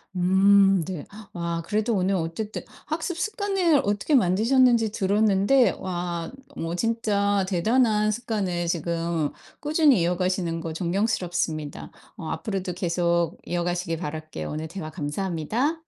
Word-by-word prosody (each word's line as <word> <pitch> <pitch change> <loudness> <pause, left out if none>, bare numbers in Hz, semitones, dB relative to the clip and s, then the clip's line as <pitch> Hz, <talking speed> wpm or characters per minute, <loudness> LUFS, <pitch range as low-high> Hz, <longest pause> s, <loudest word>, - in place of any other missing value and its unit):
음 195 +1 +5
네. 175 -6 -5 0.3
와 170 -1 -2
그래도 215 +2 0
오늘 190 +1 +1
어쨌든 180 +6 -3 0.2
학습 325 +2 -3
습관을 385 -7 +1
어떻게 205 +8 0
만드셨는지 230 +3 +4
들었는데 210 +4 +3
와 175 -2 -4 0.2
너무 165 +1 -3
진짜 205 -2 +1
대단한 215 +3 +2
습관을 200 -7 -2
지금 170 -2 -1 0.3
꾸준히 300 - +4
이어가시는 175 -1 0
거 165 -1 -5
존경스럽습니다. 175 -4 -2 0.3
어 160 - -6
앞으로도 185 +1 -3
계속 170 -1 0
이어가시길 175 -1 -2
바랄게요. 155 - -5
오늘 155 +1 -4
대화 165 -1 -6
감사합니다. 190 - -2
185 Hz, 310 characters per minute, -25 LUFS, 170-220 Hz, 0.3 s, 음